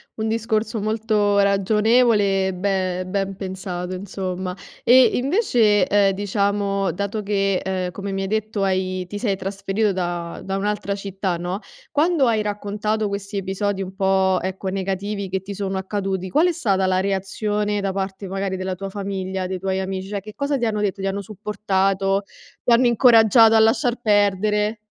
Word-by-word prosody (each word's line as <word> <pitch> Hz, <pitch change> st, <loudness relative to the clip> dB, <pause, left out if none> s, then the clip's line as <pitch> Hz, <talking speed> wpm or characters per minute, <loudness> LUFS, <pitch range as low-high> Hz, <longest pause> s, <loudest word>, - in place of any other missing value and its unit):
un 220 Hz, 0 st, -2 dB
discorso 225 Hz, 0 st, -1 dB
molto 215 Hz, -1 st, +1 dB
ragionevole 200 Hz, 0 st, +3 dB
e 190 Hz, -, -2 dB
be 185 Hz, -1 st, -1 dB
ben 195 Hz, +1 st, -2 dB
pensato, 185 Hz, -2 st, -5 dB
insomma. 185 Hz, -1 st, -4 dB, 0.3 s
E 255 Hz, +2 st, +7 dB
invece, 245 Hz, -, +3 dB
ehm, 200 Hz, 0 st, +3 dB
diciamo, 200 Hz, -1 st, 0 dB
dato 200 Hz, +4 st, -3 dB
che, 195 Hz, -2 st, 0 dB
uhm, 185 Hz, -1 st, -2 dB
come 200 Hz, +2 st, -5 dB
mi 195 Hz, 0 st, -2 dB
hai -, -, -2 dB
detto 215 Hz, 0 st, -1 dB
hai 185 Hz, -1 st, -1 dB
ti 205 Hz, +3 st, -6 dB
sei 205 Hz, -3 st, 0 dB
trasferito 195 Hz, +2 st, -1 dB
da 175 Hz, -2 st, -3 dB
da 195 Hz, 0 st, -2 dB
un'altra 205 Hz, 0 st, -2 dB
città, 195 Hz, -2 st, -3 dB
no, 180 Hz, +3 st, -3 dB, 0.3 s
quando 310 Hz, -1 st, +3 dB
hai 225 Hz, -3 st, +2 dB
raccontato 210 Hz, +1 st, -2 dB
questi 200 Hz, 0 st, -4 dB
episodi, 195 Hz, +1 st, -2 dB
un 190 Hz, 0 st, -8 dB
po', 190 Hz, -1 st, +2 dB
ecco, 190 Hz, +1 st, -3 dB
negativi, 195 Hz, +1 st, -3 dB
che 190 Hz, +1 st, -2 dB
ti 200 Hz, +1 st, -6 dB
sono 195 Hz, -1 st, -3 dB
accaduti, 190 Hz, -1 st, -3 dB
qual 310 Hz, -, +3 dB
è -, -, +2 dB
stata 195 Hz, -, +1 dB
la 185 Hz, 0 st, +2 dB
reazione 205 Hz, +2 st, -1 dB
da 195 Hz, -1 st, -1 dB
parte, 195 Hz, 0 st, -4 dB
magari, 195 Hz, 0 st, -3 dB
della 185 Hz, 0 st, -3 dB
tua 195 Hz, +2 st, -6 dB
famiglia, 190 Hz, -1 st, -4 dB
dei 185 Hz, 0 st, -4 dB
tuoi 190 Hz, 0 st, -1 dB
amici? 190 Hz, 0 st, -4 dB
Cioè, 200 Hz, 0 st, -4 dB
che 215 Hz, +2 st, -10 dB
cosa 280 Hz, +3 st, -1 dB
ti 240 Hz, -, -1 dB
hanno 210 Hz, -2 st, -1 dB
detto? 200 Hz, -1 st, -1 dB
Ti 195 Hz, -, -1 dB
hanno 195 Hz, +1 st, -2 dB
supportato? 195 Hz, -1 st, 0 dB, 0.4 s
Ti -, -, +1 dB
hanno 245 Hz, +1 st, +5 dB
incoraggiato 230 Hz, -1 st, +6 dB
a 225 Hz, -, +6 dB
lasciar 225 Hz, +2 st, +2 dB
perdere? 210 Hz, 0 st, +2 dB
200 Hz, 170 wpm, -22 LUFS, 190-210 Hz, 0.4 s, E